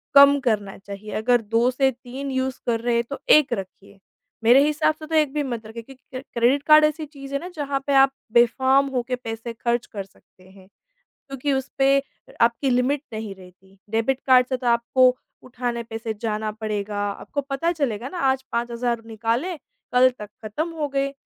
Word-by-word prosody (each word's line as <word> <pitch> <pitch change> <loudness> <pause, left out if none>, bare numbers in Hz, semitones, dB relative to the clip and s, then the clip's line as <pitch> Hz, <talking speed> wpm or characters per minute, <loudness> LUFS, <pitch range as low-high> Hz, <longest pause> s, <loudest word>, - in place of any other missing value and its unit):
कम 280 0 +8
करना 205 -3 0
चाहिए, 200 +1 -9
अगर 240 +2 +2
2 230 +3 +1
से 265 +1 +2
3 260 +3 -7
यूज़ 260 0 -2
कर 230 -1 +1
रहे 240 0 0
हैं। 235 - +2
तो 280 - -5
1 300 -5 +6
रखिए, 195 -1 -8 0.4
मेरे 250 +5 +6
हिसाब 310 +1 +1
से 310 - -10
तो 320 - -2
1 300 -3 +2
भी 295 -1 0
मत 235 -4 -5
रखिए 225 +1 -8
क्योंकि 260 +1 -16
क्रे 255 0 -5
क्रेडिट 250 +4 +2
कार्ड 305 0 +8
ऐसी 305 +1 -1
चीज़ 280 -2 -11
है 280 - 0
ना 350 - -7
जहाँ 285 -2 -2
पे 280 - +1
आप 270 0 +6 0.2
बेफ़र्म 260 +4 +4
होके 250 +1 -1
पैसे 230 -1 -6
खर्च 235 +1 -1
कर 200 -3 -6
सकते 185 -1 -26
हैं। 190 -1 -18 0.6
क्योंकि 275 +1 -2
उस 265 -1 -2
पे 275 0 +4 0.4
आपकी 235 +3 +2
लिमिट 255 +3 +1
नहीं 215 -2 -5
रहती, 190 +1 -18
डेबिट 230 +4 0
कार्ड 255 -2 +6
से 260 - 0
तो 250 - -7
आपको 250 +2 +3 0.3
उठाने 245 -1 -4
पैसे 225 -1 -5
जाना 215 -1 -2
पड़ेगा, 210 -1 -4
आपको 285 +7 -5
पता 280 +5 -1
चलेगा 255 -6 -2
ना 360 - -7
आज 265 0 -1
5 235 +1 -1
हज़ार 235 -1 -2
निकाले, 230 - -2 0.4
कल 255 +1 +6
तक 210 - -8 0.2
खत्म 300 +11 -3
हो 305 -3 -3
गए। 275 0 -1
250 Hz, 195 wpm, -23 LUFS, 225-275 Hz, 0.6 s, कम